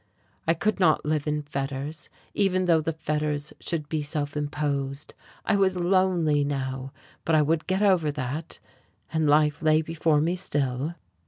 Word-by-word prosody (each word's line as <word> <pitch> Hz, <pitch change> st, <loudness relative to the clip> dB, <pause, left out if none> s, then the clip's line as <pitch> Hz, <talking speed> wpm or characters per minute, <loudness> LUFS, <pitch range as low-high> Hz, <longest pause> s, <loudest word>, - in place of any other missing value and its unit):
I 165 Hz, -, +4 dB
could 215 Hz, +5 st, 0 dB
not 160 Hz, -6 st, +3 dB
live 150 Hz, -1 st, 0 dB
in 150 Hz, 0 st, -1 dB
fetters, 140 Hz, +2 st, -4 dB, 0.2 s
even 185 Hz, -2 st, +2 dB
though 165 Hz, -3 st, +4 dB
the 165 Hz, -, -1 dB
fetters 150 Hz, -1 st, -2 dB
should 160 Hz, -4 st, -3 dB
be 155 Hz, 0 st, -1 dB
self 145 Hz, -1 st, -3 dB
imposed. 145 Hz, -1 st, -2 dB, 0.3 s
I -, -, +2 dB
was 190 Hz, -2 st, +2 dB
lonely 175 Hz, -5 st, +2 dB
now, 135 Hz, -2 st, -3 dB, 0.3 s
but 165 Hz, -, +2 dB
I 155 Hz, -, +5 dB
would 155 Hz, +1 st, 0 dB
get 190 Hz, +2 st, +1 dB
over 185 Hz, -6 st, +3 dB
that, 145 Hz, +3 st, -4 dB, 0.6 s
and 160 Hz, -1 st, +2 dB
life 150 Hz, 0 st, +3 dB
lay 155 Hz, 0 st, +3 dB
before 160 Hz, -1 st, +1 dB
me 165 Hz, +4 st, +1 dB
still. 145 Hz, -2 st, -1 dB
155 Hz, 160 wpm, -26 LUFS, 145-165 Hz, 0.6 s, I